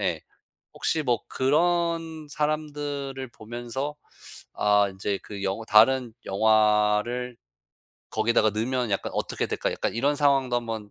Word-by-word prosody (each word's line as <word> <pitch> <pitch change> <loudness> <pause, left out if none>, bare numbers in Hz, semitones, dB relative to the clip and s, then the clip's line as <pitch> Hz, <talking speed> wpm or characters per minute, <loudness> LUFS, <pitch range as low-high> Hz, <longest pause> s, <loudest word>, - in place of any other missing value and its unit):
예. - - -1 0.5
혹시 160 -1 0
뭐 120 -5 +1
그런 165 +2 0
사람들을 145 -3 -3
보면서 120 +6 -5 0.6
'아 105 -1 +3
인제 95 +1 -2
그 100 -2 -8
영 95 +2 -1
다른 115 +2 +5
영화를 110 +3 +2 0.8
거기다가 110 0 +2
넣으면 120 +2 -1
약간 100 - -2
어떻게 - - -2
될까?' - - -2
약간 - - -2
이런 140 +5 +1
상황도 135 -4 +2
한번 110 -3 -4
125 Hz, 255 characters per minute, -26 LUFS, 110-145 Hz, 0.8 s, 다른